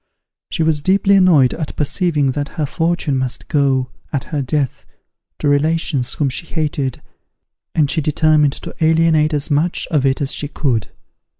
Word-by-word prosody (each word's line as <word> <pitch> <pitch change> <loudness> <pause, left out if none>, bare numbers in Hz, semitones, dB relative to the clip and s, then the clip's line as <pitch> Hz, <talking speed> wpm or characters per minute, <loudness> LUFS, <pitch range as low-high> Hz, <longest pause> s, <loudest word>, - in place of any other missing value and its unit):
She 165 - -1
was 155 -2 +1
deeply 195 +4 +3
annoyed 170 -9 +5
at 155 -3 -5
perceiving 150 -2 0
that 145 +1 -3
her 155 - 0
fortune 165 -2 -1
must 130 -1 -4
go, 135 -3 +1 0.2
at 140 -4 -2
her 150 -3 -3
death, 135 0 -2 0.5
to - - -2
relations 145 -2 +1
whom 145 - 0
she 135 +5 -3
hated, 145 -5 -3 0.7
and 150 -3 +3
she 160 +3 -1
determined 150 -1 +2
to - - -8
alienate 160 -1 +3
as 145 +1 -2
much 155 +5 +1
of 150 -5 +2
it 135 -1 +1
as 140 -1 -1
she 145 - -3
could. 125 -7 -1
150 Hz, 165 wpm, -18 LUFS, 140-160 Hz, 0.7 s, annoyed